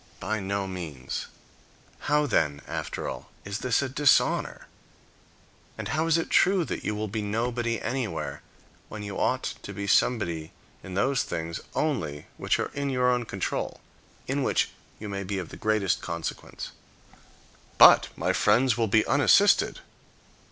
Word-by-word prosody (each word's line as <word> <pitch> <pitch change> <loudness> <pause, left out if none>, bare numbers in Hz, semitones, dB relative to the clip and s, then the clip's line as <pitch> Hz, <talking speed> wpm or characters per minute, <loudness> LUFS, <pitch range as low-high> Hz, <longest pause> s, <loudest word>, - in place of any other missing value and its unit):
By 110 +2 -2
no 100 0 -2
means. 85 -9 -5 0.8
How, 150 0 +3
then, 75 - +1
after - - -4
all, - - -6 0.2
is 100 +1 -4
this 130 +1 +1
a - - -1
dishonor? 140 +2 +2 1.1
And - - -5
how 155 +1 0
is 165 0 +4
it 165 - -3
true 185 -2 +4
that - - -4
you 105 - -1
will 110 +1 -2
be 105 +2 -3
nobody 115 +2 -1
anywhere, 85 - -3 0.5
when 110 -1 -7
you 100 -1 -5
ought - - +1 0.2
to - - -8
be 100 - -4
somebody 85 -8 +1 0.3
in 95 - -8
those 130 +7 +2
things 85 +1 -4 0.2
only 80 - -1
which - - +1
are - - -3
in 140 0 -2
your 125 -1 +2
own 125 -1 0
control, 95 -4 -3 0.5
in 140 +2 -1
which - - +1 0.3
you 105 - -6
may 100 -1 -4
be 100 +1 -3
of 90 -4 -5
the - - -9
greatest 110 -3 +1
consequence? 85 -1 -5 1.1
"But - - +9
my - - 0
friends 125 -1 +3
will 115 -1 +1
be 110 +1 +3
unassisted." 195 +8 +4
110 Hz, 155 wpm, -27 LUFS, 95-130 Hz, 1.1 s, But